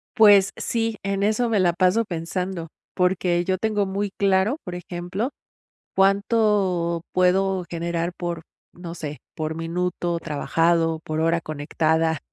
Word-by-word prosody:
Pues 205 Hz, -4 st, +7 dB
sí, 225 Hz, -2 st, -1 dB
en 195 Hz, 0 st, -1 dB
eso 220 Hz, +4 st, +2 dB
me 215 Hz, -3 st, +2 dB
la 175 Hz, -2 st, +3 dB
paso 185 Hz, +6 st, +3 dB
pensando 175 Hz, 0 st, -4 dB, 0.3 s
porque 180 Hz, -1 st, +1 dB
yo 185 Hz, 0 st, +1 dB
tengo 210 Hz, -1 st, +1 dB
muy 200 Hz, +1 st, -2 dB
claro, 195 Hz, +6 st, +2 dB
por 180 Hz, -, -6 dB
ejemplo, 180 Hz, +6 st, -4 dB, 0.7 s
cuánto 195 Hz, -4 st, +2 dB
puedo 185 Hz, 0 st, +2 dB
generar, 170 Hz, 0 st, -2 dB
por 170 Hz, -2 st, -4 dB, 0.3 s
no 170 Hz, -1 st, -8 dB
sé 150 Hz, -3 st, -6 dB, 0.2 s
por 155 Hz, 0 st, -3 dB
minuto 170 Hz, +1 st, -2 dB
trabajado 165 Hz, +1 st, +1 dB
por 155 Hz, 0 st, -2 dB
hora 165 Hz, +1 st, +2 dB
conectada. 160 Hz, +1 st, 0 dB
180 Hz, 130 wpm, -23 LUFS, 165-195 Hz, 0.7 s, Pues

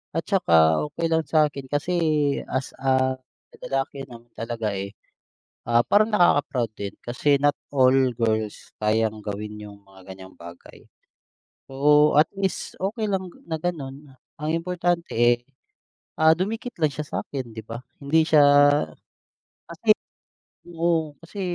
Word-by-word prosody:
At 165 Hz, -, -1 dB
saka 80 Hz, -, +4 dB
okey 170 Hz, -, -3 dB
lang 160 Hz, 0 st, +3 dB
sa'kin 150 Hz, -4 st, +1 dB
kasi 145 Hz, +6 st, -1 dB, 0.6 s
as 130 Hz, +1 st, -2 dB
a 130 Hz, -1 st, +1 dB, 0.4 s
lalaki 135 Hz, 0 st, -3 dB
naman 120 Hz, -1 st, -13 dB
talaga, 115 Hz, -2 st, -3 dB
eh, 100 Hz, +1 st, -5 dB, 0.8 s
ah, 120 Hz, 0 st, +5 dB
parang 215 Hz, -, +3 dB
nakaka-proud 145 Hz, -, +2 dB
din 100 Hz, 0 st, -5 dB
kasi 140 Hz, +4 st, +1 dB
not 145 Hz, +1 st, +2 dB, 0.2 s
all 130 Hz, -2 st, +4 dB, 0.2 s
girls, 110 Hz, -2 st, -2 dB
kayang 110 Hz, 0 st, 0 dB
gawin 105 Hz, +1 st, -5 dB
yung 100 Hz, -1 st, -11 dB
mga 95 Hz, -1 st, -16 dB
ganyang 95 Hz, 0 st, -13 dB
bagay. 85 Hz, 0 st, -13 dB, 0.9 s
So, 150 Hz, +2 st, +4 dB
at 155 Hz, -, +5 dB
least 195 Hz, -2 st, -3 dB
okey 215 Hz, +3 st, -1 dB
lang 190 Hz, -3 st, -2 dB, 0.2 s
na 160 Hz, -, -2 dB
ganun, 145 Hz, -4 st, -5 dB, 0.2 s
ang 150 Hz, 0 st, -4 dB
importante, 175 Hz, 0 st, -1 dB
eh, 120 Hz, +1 st, +4 dB, 0.8 s
ah, 160 Hz, 0 st, +6 dB
dumikit 220 Hz, +8 st, -4 dB
lang 155 Hz, -, +4 dB
siya 150 Hz, +1 st, -5 dB
sa'kin 130 Hz, -4 st, -5 dB
'di 110 Hz, -, -7 dB
ba. 115 Hz, +2 st, -7 dB, 0.2 s
Hindi 155 Hz, +3 st, +2 dB
siya 155 Hz, -2 st, +5 dB, 1.3 s
kasi 170 Hz, +7 st, -6 dB, 0.8 s
oo. 165 Hz, -2 st, 0 dB
Kasi, 185 Hz, +4 st, -8 dB
140 Hz, 135 wpm, -24 LUFS, 115-165 Hz, 1.3 s, ah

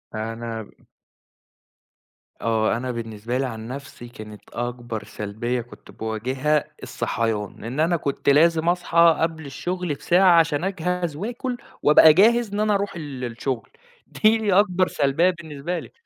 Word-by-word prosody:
أنا 115 Hz, 0 st, -5 dB, 1.7 s
آه، 115 Hz, 0 st, +1 dB
أنا 130 Hz, +1 st, -3 dB
بالنسبة 115 Hz, +1 st, -4 dB
لي 135 Hz, -, 0 dB
عن 110 Hz, -2 st, -6 dB
نفْسي 130 Hz, -2 st, -8 dB
كانت 105 Hz, -3 st, -11 dB
أكبر 120 Hz, -2 st, -4 dB
سلبيّة 110 Hz, +5 st, -4 dB
كُنت 120 Hz, -, -15 dB
باواجهها 130 Hz, +7 st, -1 dB, 0.2 s
الصحيان، 110 Hz, -3 st, -3 dB
إن 125 Hz, +6 st, -5 dB
أنا 170 Hz, +2 st, +2 dB
كنت 140 Hz, -1 st, -1 dB
لازم 165 Hz, +3 st, +4 dB
أصحى 170 Hz, -2 st, +4 dB
قبل 160 Hz, -2 st, -1 dB
الشُغل 175 Hz, +4 st, -3 dB
بساعة 175 Hz, +3 st, +4 dB
عشان 160 Hz, 0 st, +1 dB
أجهز 180 Hz, -4 st, -2 dB
وآكل، 240 Hz, -, -4 dB, 0.3 s
وأبقى 150 Hz, +1 st, +8 dB
جاهز 225 Hz, +3 st, +4 dB
إن 205 Hz, -, -2 dB
أنا 215 Hz, -1 st, +2 dB
أروح 200 Hz, -2 st, -2 dB
ال 140 Hz, -6 st, -7 dB
الشُغل، 120 Hz, +1 st, -4 dB, 0.4 s
دي 215 Hz, -2 st, +2 dB
أكبر 185 Hz, -2 st, +3 dB
سلبيّة 145 Hz, +6 st, +2 dB
بالنسبة 170 Hz, 0 st, -4 dB
لي. -, -, -11 dB
145 Hz, 135 wpm, -23 LUFS, 120-175 Hz, 1.7 s, وأبقى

